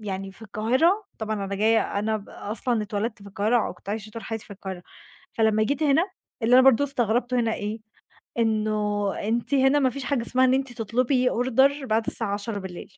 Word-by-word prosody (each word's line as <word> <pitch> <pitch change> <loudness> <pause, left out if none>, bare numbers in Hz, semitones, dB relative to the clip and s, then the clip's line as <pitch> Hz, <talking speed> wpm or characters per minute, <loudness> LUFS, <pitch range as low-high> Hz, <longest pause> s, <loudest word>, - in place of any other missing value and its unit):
يعني 195 -2 -5
في 210 - -16
القاهرة، 255 - +1
طبعًا 215 -2 -2
أنا 195 0 -3
جاية 215 0 +2
أنا 220 +1 0
ب 205 - -10
أصلًا 225 +2 -2
اتولدت 210 0 -3
في 200 - -10
القاهرة، 215 +3 +1
وكنت 175 +2 -14
عايشة 215 +1 -4
طول 230 +1 -8
حياتي 225 -1 -5
في - - -10
القاهرة، 190 -2 -7 0.5
فلمّا 220 -1 +2
جيت 280 +6 -1
هنا 315 +6 +3 0.3
اللي 230 +2 +4
أنا 260 - +8
برضه 270 +1 +5
استغربته 245 -2 0
هنا 225 -1 0
إيه؟ 210 +2 -4 0.6
إنه 215 -2 0
أنتِ 230 +6 -1
هنا 270 +1 +4
ما 265 -2 +3
فيش 275 +2 -6
حاجة 265 -1 0
اسمها 255 +2 +2
إن 255 - +3
أنتِ 265 -2 -1
تطلبي 250 +4 +1
order 265 +4 +2
بعد 220 -1 0
الساعة 215 -4 -2
22:00 200 -3 -6
225 Hz, 190 wpm, -25 LUFS, 210-255 Hz, 0.6 s, أنا